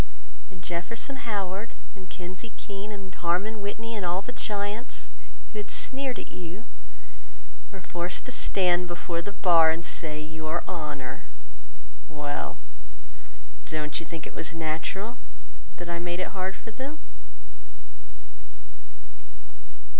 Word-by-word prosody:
And 180 Hz, -3 st, -10 dB
Jefferson 180 Hz, +11 st, 0 dB
Howard 200 Hz, +1 st, 0 dB, 0.2 s
and 185 Hz, -2 st, -9 dB
Kinsey 185 Hz, +5 st, -5 dB
Keene, 200 Hz, 0 st, -4 dB
And 195 Hz, -3 st, -5 dB
Harmon 190 Hz, +6 st, +3 dB
Whitney, 225 Hz, +3 st, -1 dB
and 205 Hz, -, 0 dB
all 180 Hz, +2 st, +3 dB
the 250 Hz, -, -3 dB
giants 210 Hz, 0 st, -1 dB, 0.4 s
Who 215 Hz, -, -1 dB
had 205 Hz, -, -3 dB
sneered 265 Hz, -2 st, +1 dB
at -, -, -5 dB
you, 180 Hz, +6 st, -5 dB, 1.1 s
were 195 Hz, -2 st, -6 dB
forced 175 Hz, 0 st, 0 dB
to 255 Hz, -, -3 dB
stand 180 Hz, -6 st, +5 dB
Before 175 Hz, 0 st, 0 dB
the 205 Hz, -, -3 dB
bar 170 Hz, -5 st, +8 dB
and 165 Hz, +1 st, +2 dB
say 155 Hz, -2 st, -1 dB
"Your 155 Hz, +2 st, 0 dB
Honor"— 150 Hz, -6 st, -2 dB, 0.8 s
Well, 150 Hz, -2 st, -1 dB, 1.1 s
don't 155 Hz, -1 st, +1 dB
you 165 Hz, -, -4 dB
think 165 Hz, -3 st, -3 dB
it -, -, -6 dB
was 165 Hz, -, -1 dB
natural 165 Hz, +8 st, 0 dB, 0.6 s
That 175 Hz, -, -4 dB
I 170 Hz, 0 st, +1 dB
made 175 Hz, +1 st, 0 dB
it 185 Hz, -, +2 dB
hard 190 Hz, 0 st, 0 dB
for 225 Hz, -, -7 dB
them? 270 Hz, +6 st, -3 dB
180 Hz, 130 wpm, -31 LUFS, 170-205 Hz, 1.1 s, bar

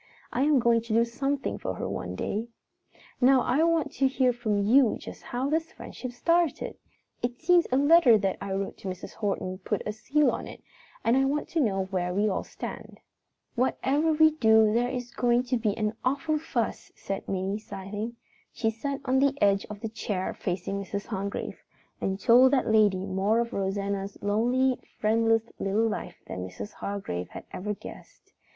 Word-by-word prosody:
I 250 Hz, -, 0 dB
am 300 Hz, -1 st, +4 dB
going 235 Hz, -1 st, +3 dB
to 225 Hz, -1 st, -4 dB
do 230 Hz, +1 st, +4 dB
something 275 Hz, +4 st, -2 dB
for -, -, -3 dB
her -, -, -4 dB
some -, -, -4 dB
day. 220 Hz, +3 st, -3 dB, 0.7 s
"Now 260 Hz, +1 st, +6 dB
I 265 Hz, +5 st, +2 dB
want 330 Hz, -1 st, +2 dB
to 270 Hz, -, +2 dB
hear 260 Hz, -2 st, +2 dB
from 215 Hz, -4 st, 0 dB
you 240 Hz, +3 st, +5 dB
just -, -, -10 dB
how 250 Hz, +2 st, -3 dB
this 320 Hz, +2 st, -1 dB
friendship 255 Hz, -, -8 dB
started. 335 Hz, +6 st, 0 dB, 0.4 s
It 245 Hz, +1 st, -3 dB
seems 355 Hz, -1 st, +4 dB
a 255 Hz, -, +3 dB
letter 285 Hz, -5 st, +6 dB
that 195 Hz, -2 st, -1 dB
I 200 Hz, -, -4 dB
wrote 195 Hz, 0 st, -3 dB
to -, -, -7 dB
Mrs. 185 Hz, -1 st, -6 dB
Horton 195 Hz, -3 st, -3 dB
put 200 Hz, +2 st, -3 dB
the 210 Hz, -, -2 dB
seal 290 Hz, +7 st, +2 dB
on -, -, -5 dB
it -, -, -11 dB, 0.4 s
and 230 Hz, -, +3 dB
I 270 Hz, 0 st, +3 dB
want 290 Hz, +2 st, -1 dB
to 335 Hz, -, -1 dB
know 195 Hz, -8 st, +1 dB
where 180 Hz, -2 st, -2 dB
we 205 Hz, +2 st, +2 dB
all 195 Hz, -, -1 dB
stand." -, -, -8 dB, 0.5 s
"Whatever 270 Hz, +5 st, +1 dB
we 315 Hz, 0 st, +6 dB
do 220 Hz, -7 st, +4 dB
there 240 Hz, +2 st, +2 dB
is 245 Hz, -2 st, -5 dB
going 240 Hz, 0 st, +2 dB
to 250 Hz, 0 st, 0 dB
be 215 Hz, -3 st, -1 dB
an 215 Hz, -1 st, 0 dB
awful 290 Hz, +4 st, 0 dB
fuss," 245 Hz, -8 st, -3 dB
said 195 Hz, 0 st, -5 dB
Minnie, 195 Hz, +2 st, -1 dB
sighing. 210 Hz, +3 st, -6 dB, 0.4 s
She 225 Hz, -2 st, 0 dB
sat 275 Hz, +5 st, -4 dB
on 265 Hz, 0 st, +2 dB
the 280 Hz, 0 st, +2 dB
edge 200 Hz, -1 st, +3 dB
of 210 Hz, -1 st, -8 dB
the 225 Hz, -, -3 dB
chair 210 Hz, -4 st, -3 dB
facing 190 Hz, +2 st, -3 dB
Mrs. 200 Hz, +1 st, -5 dB
Hargrave 200 Hz, -2 st, -4 dB, 0.4 s
and 190 Hz, 0 st, -1 dB
told 250 Hz, +6 st, +6 dB
that 265 Hz, -, +3 dB
lady 210 Hz, -4 st, +3 dB
more 195 Hz, +3 st, +1 dB
of 235 Hz, +1 st, -2 dB
Rosanna's 195 Hz, 0 st, -2 dB
lonely, 245 Hz, +5 st, +2 dB, 0.2 s
friendless 225 Hz, +1 st, +3 dB, 0.2 s
little 210 Hz, +4 st, +1 dB
life 215 Hz, -, -4 dB
than 95 Hz, -, -6 dB
Mrs. 95 Hz, +2 st, -8 dB
Hargrave 195 Hz, -, -4 dB
had -, -, -9 dB
ever 210 Hz, +2 st, -3 dB
guessed. -, -, -13 dB
225 Hz, 185 wpm, -27 LUFS, 200-260 Hz, 0.7 s, Now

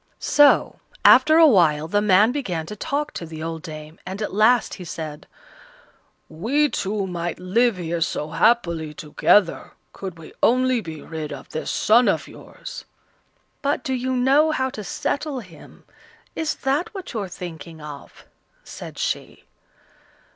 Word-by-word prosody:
So, 290 Hz, -1 st, +4 dB, 0.3 s
after 310 Hz, +1 st, +7 dB
a 330 Hz, -, +8 dB
while, 160 Hz, -, +4 dB
the 205 Hz, +5 st, +1 dB
man 210 Hz, +2 st, +5 dB
began 185 Hz, -, -3 dB
to 210 Hz, -, -7 dB
talk 295 Hz, +6 st, -2 dB
to -, -, -6 dB
the 160 Hz, 0 st, -7 dB
old 165 Hz, 0 st, -4 dB
dame, 155 Hz, 0 st, -9 dB
and 190 Hz, +2 st, -6 dB
at 210 Hz, -, -3 dB
last 220 Hz, +4 st, +3 dB
he 185 Hz, -, -8 dB
said: 155 Hz, -3 st, -7 dB, 1.0 s
"We 255 Hz, -, 0 dB
two 200 Hz, -2 st, -2 dB
might 175 Hz, -2 st, -4 dB
live 215 Hz, +4 st, +2 dB
here 170 Hz, -1 st, -3 dB
so 155 Hz, -2 st, -1 dB
happily 170 Hz, -9 st, +1 dB
together, 165 Hz, +4 st, +2 dB, 0.2 s
could 190 Hz, -3 st, -7 dB
we 165 Hz, -, -12 dB
only 255 Hz, 0 st, +3 dB
be 160 Hz, -5 st, -8 dB
rid 155 Hz, -2 st, -6 dB
of 140 Hz, -2 st, -9 dB
this 155 Hz, -, -4 dB
son 235 Hz, +3 st, +4 dB
of -, -, 0 dB
yours." -, -, -10 dB, 0.8 s
"But 285 Hz, 0 st, -1 dB
do 265 Hz, -4 st, -2 dB
you 260 Hz, 0 st, -1 dB
know 275 Hz, +5 st, +4 dB
how 260 Hz, -4 st, 0 dB
to 215 Hz, -, -7 dB
settle 285 Hz, +6 st, -3 dB
him? 170 Hz, -7 st, -16 dB, 0.5 s
Is 320 Hz, -1 st, -1 dB
that 295 Hz, +10 st, -1 dB
what 380 Hz, -6 st, -7 dB
you're 210 Hz, -4 st, -3 dB
thinking 170 Hz, -2 st, -9 dB
of?" 150 Hz, -2 st, -11 dB, 0.4 s
said -, -, -10 dB
she. -, -, -3 dB
200 Hz, 155 wpm, -22 LUFS, 165-260 Hz, 1.0 s, a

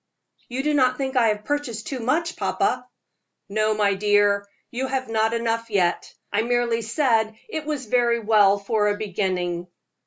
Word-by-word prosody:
"You 255 Hz, +2 st, -3 dB
do 300 Hz, +1 st, +1 dB
not 255 Hz, -3 st, +3 dB
think 265 Hz, -1 st, -3 dB
I 240 Hz, -3 st, +4 dB
have 210 Hz, -1 st, -1 dB
purchased 260 Hz, -7 st, -3 dB
too 265 Hz, -, -4 dB
much, 320 Hz, +8 st, 0 dB
papa?" -, -, -1 dB, 0.6 s
"No, 215 Hz, +1 st, +1 dB
my 205 Hz, -1 st, +2 dB
dear, 205 Hz, 0 st, +2 dB, 0.2 s
you 260 Hz, +2 st, -2 dB
have 260 Hz, -1 st, -2 dB
not 220 Hz, 0 st, +1 dB
enough 230 Hz, 0 st, -1 dB
yet. 185 Hz, -5 st, 0 dB, 0.2 s
I 205 Hz, -, +3 dB
merely 235 Hz, 0 st, 0 dB
said 225 Hz, -2 st, +1 dB
it 315 Hz, -8 st, -5 dB
was 295 Hz, -4 st, -3 dB
very 235 Hz, +1 st, +2 dB
well 205 Hz, -2 st, +4 dB
for 210 Hz, +1 st, 0 dB
a 205 Hz, 0 st, 0 dB
beginning." 180 Hz, -4 st, -2 dB
225 Hz, 165 wpm, -23 LUFS, 205-255 Hz, 0.6 s, I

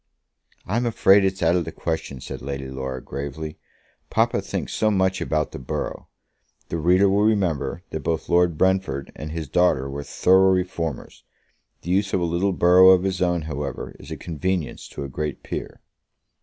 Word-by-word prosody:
"I'm 115 Hz, +5 st, 0 dB
afraid 100 Hz, -3 st, +5 dB
it's 95 Hz, -2 st, 0 dB
out 85 Hz, +1 st, +4 dB
of 90 Hz, -, +1 dB
the -, -, -6 dB
question," 80 Hz, -5 st, -4 dB
said -, -, -7 dB
Lady 70 Hz, 0 st, -5 dB
Laura, 65 Hz, -1 st, -5 dB
gravely. 70 Hz, +3 st, -6 dB, 0.5 s
"Papa -, -, +1 dB
thinks -, -, -4 dB
so 110 Hz, -, +2 dB
much 95 Hz, -2 st, +1 dB
about 75 Hz, -2 st, -1 dB
the -, -, -7 dB
borough." 65 Hz, -, -4 dB, 0.6 s
The 85 Hz, -, -2 dB
reader 90 Hz, +5 st, +4 dB
will 100 Hz, +1 st, +2 dB
remember 90 Hz, -7 st, 0 dB
that 80 Hz, -, -3 dB
both 80 Hz, +2 st, -2 dB
Lord 85 Hz, -2 st, +3 dB
Brentford 95 Hz, -8 st, 0 dB
and 75 Hz, +1 st, -7 dB
his 80 Hz, -2 st, -4 dB
daughter 70 Hz, -4 st, +2 dB
were 70 Hz, +1 st, -5 dB
thorough 95 Hz, +6 st, +4 dB
reformers! 85 Hz, -5 st, -3 dB, 0.6 s
The 90 Hz, -, -3 dB
use 100 Hz, +1 st, +1 dB
of -, -, +2 dB
a -, -, -1 dB
little 85 Hz, +4 st, +1 dB
borough 90 Hz, +1 st, +6 dB
of 95 Hz, -1 st, +6 dB
his 95 Hz, -2 st, -2 dB
own, 90 Hz, -2 st, +1 dB
however, 75 Hz, -3 st, -5 dB
is -, -, -12 dB
a -, -, -5 dB
convenience 85 Hz, 0 st, -3 dB
to -, -, -7 dB
a -, -, -4 dB
great 75 Hz, +2 st, -4 dB
peer. -, -, -6 dB
85 Hz, 180 wpm, -23 LUFS, 75-95 Hz, 0.6 s, borough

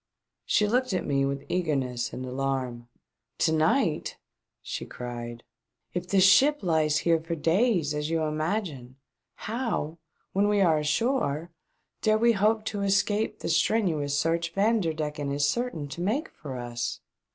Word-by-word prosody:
She 210 Hz, -, +3 dB
looked 250 Hz, +1 st, +1 dB
at 185 Hz, -, -1 dB
me 140 Hz, -1 st, +1 dB
with 140 Hz, 0 st, -4 dB
eagerness 135 Hz, -9 st, -1 dB
and 130 Hz, -, -6 dB
alarm. 130 Hz, -2 st, -3 dB, 0.5 s
"To -, -, +2 dB
night 160 Hz, -, +1 dB, 0.2 s
!" -, -, -60 dB
she -, -, -4 dB
cried. 120 Hz, -1 st, -7 dB, 0.5 s
"If 180 Hz, 0 st, -3 dB
this 190 Hz, 0 st, +4 dB
ship 265 Hz, +9 st, +5 dB
lies 155 Hz, -3 st, +2 dB
here 165 Hz, -1 st, +4 dB
for 165 Hz, +1 st, -4 dB
days, 165 Hz, -, +2 dB
as 150 Hz, +1 st, -2 dB
you 165 Hz, -1 st, 0 dB
imagine, 155 Hz, -, -2 dB, 0.5 s
how, 215 Hz, -, -2 dB, 0.3 s
when 200 Hz, +2 st, +3 dB
we 205 Hz, 0 st, +2 dB
are 165 Hz, -5 st, +4 dB
ashore, 160 Hz, -, 0 dB, 0.5 s
dare 215 Hz, -1 st, +3 dB
we 235 Hz, +2 st, +4 dB
hope 215 Hz, +1 st, +2 dB
to 205 Hz, -2 st, -3 dB
escape 205 Hz, +2 st, +1 dB
the -, -, -3 dB
strenuous 160 Hz, -6 st, +1 dB
search 165 Hz, +2 st, 0 dB
Vanderdecken 160 Hz, -9 st, 0 dB
is 140 Hz, 0 st, +1 dB
certain 175 Hz, -, -2 dB
to 170 Hz, -, -6 dB
make 235 Hz, -, -1 dB
for 135 Hz, -4 st, -8 dB
us 120 Hz, -1 st, -4 dB
165 Hz, 150 wpm, -27 LUFS, 145-205 Hz, 0.5 s, ship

